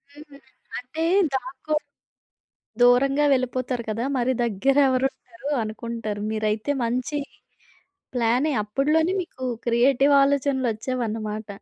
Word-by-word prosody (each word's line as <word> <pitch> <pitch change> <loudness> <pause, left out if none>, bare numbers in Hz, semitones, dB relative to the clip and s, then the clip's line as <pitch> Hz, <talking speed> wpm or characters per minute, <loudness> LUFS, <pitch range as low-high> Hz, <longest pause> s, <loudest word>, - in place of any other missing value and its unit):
హ్మ్. 295 -2 -14 0.4
అంటే 260 +6 -5 0.3
దాక్కో 265 +3 -3 1.1
దూరంగా 270 +4 +4
వెళ్ళిపోతారు 255 -1 -1
కదా! 225 +3 -2
మరి 255 +1 +1
దగ్గరేవరుంటారు 260 +2 0
అనుకుంటారు. 215 -1 -5
మీరైతే 215 +4 -1
మంచి 250 +5 -1 1.0
ప్లానే 245 +6 +2
అప్పడులోనే 300 - +1
మీకు 260 -7 -7 0.2
క్రియేటివ్ 260 +4 +3
ఆలోచనలోచ్చేవన్నమాట. 240 -5 -1
255 Hz, 85 wpm, -24 LUFS, 230-275 Hz, 1.1 s, దూరంగా